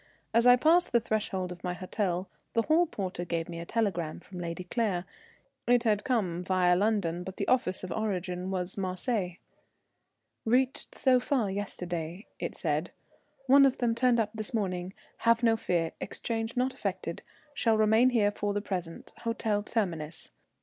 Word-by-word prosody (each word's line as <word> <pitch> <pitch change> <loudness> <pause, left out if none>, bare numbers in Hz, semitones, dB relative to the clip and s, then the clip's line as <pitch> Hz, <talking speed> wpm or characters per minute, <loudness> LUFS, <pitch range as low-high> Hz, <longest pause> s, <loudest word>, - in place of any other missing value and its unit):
As 230 +2 +4
I 245 - +9
passed 325 +6 +3
the 235 - +6
threshold 205 -5 -2
of 175 -1 -9
my 180 -1 -2
hotel, 185 -1 -2 0.3
the 230 - +2
hall 330 +5 +3
porter 185 - -4
gave 165 -1 -2
me 170 -1 -6
a 170 - -7
telegram 185 -8 -1
from 185 -2 -10
Lady 170 +1 -4
Claire. 185 -2 -1 0.6
It 245 0 +4
had 210 -3 +2
come 185 -9 0
via 180 -1 +3
London, 185 -4 +1
but 190 +1 -8
the - - -2
office 215 -8 +1
of 185 - -5
origin 185 -4 -2
was 185 0 -3
Marseilles. 185 0 -1 1.1
"Reached 255 +3 +1
so 255 -2 +4
far, 245 -5 0
yesterday," 180 -2 -4
it - - -4
said. - - -1 0.6
"One 275 +2 +7
of 270 -2 +4
them 240 -2 +1
turned 240 0 +3
up 215 -2 0
this 220 +1 -1
morning 185 -3 -2 0.2
have 230 +1 +3
no 225 -1 +5
fear 170 -6 0
exchange 225 +3 -3
not 255 +1 +1
effected 185 -4 -4 0.3
shall 225 -5 +2
remain 220 +3 +5
here 215 -5 +3
for 205 0 -2
the - - +2
present 180 -5 -5
Hotel 225 -3 0
Terminus. 175 -8 -3
205 Hz, 165 wpm, -29 LUFS, 180-230 Hz, 1.1 s, I